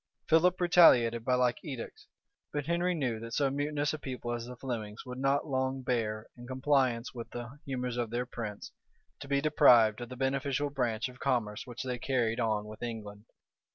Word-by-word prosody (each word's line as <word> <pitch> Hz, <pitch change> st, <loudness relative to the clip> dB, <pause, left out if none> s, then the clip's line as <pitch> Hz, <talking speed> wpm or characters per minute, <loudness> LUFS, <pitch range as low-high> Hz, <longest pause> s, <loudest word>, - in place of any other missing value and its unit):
Philip 175 Hz, +3 st, +4 dB
retaliated 125 Hz, -10 st, +6 dB
by 125 Hz, +2 st, +2 dB
like 125 Hz, -1 st, +1 dB
edicts; 130 Hz, -6 st, -7 dB, 0.4 s
but 145 Hz, -2 st, -2 dB
Henry 175 Hz, +2 st, +1 dB
knew, 125 Hz, -8 st, -1 dB
that 115 Hz, +1 st, -6 dB
so 140 Hz, -2 st, +2 dB
mutinous 145 Hz, +1 st, -1 dB
a 155 Hz, -, -4 dB
people 125 Hz, -3 st, -4 dB
as 120 Hz, 0 st, -4 dB
the 125 Hz, -, -8 dB
Flemings 115 Hz, -4 st, -5 dB
would 125 Hz, 0 st, -7 dB
not 135 Hz, +1 st, +1 dB
long 130 Hz, -1 st, -1 dB
bear, 110 Hz, -3 st, -1 dB
in 120 Hz, -1 st, -11 dB
compliance 130 Hz, -2 st, +1 dB
with 120 Hz, -2 st, -7 dB
the 120 Hz, +4 st, -8 dB
humors 125 Hz, -2 st, -3 dB
of 120 Hz, -2 st, -1 dB
their 120 Hz, +2 st, -2 dB
prince, 110 Hz, -4 st, -6 dB, 0.5 s
to 140 Hz, -, -8 dB
be 140 Hz, 0 st, +1 dB
deprived 120 Hz, -7 st, +5 dB
of 120 Hz, -, -6 dB
the 130 Hz, -, -7 dB
beneficial 135 Hz, +2 st, 0 dB
branch 120 Hz, -4 st, -1 dB
of 125 Hz, 0 st, -13 dB
commerce 120 Hz, -6 st, -1 dB
which 120 Hz, 0 st, -6 dB
they 125 Hz, -2 st, -3 dB
carried 120 Hz, -3 st, 0 dB
on 110 Hz, -3 st, 0 dB
with 105 Hz, 0 st, -10 dB
England. 110 Hz, -3 st, -6 dB
125 Hz, 190 wpm, -31 LUFS, 115-140 Hz, 0.5 s, retaliated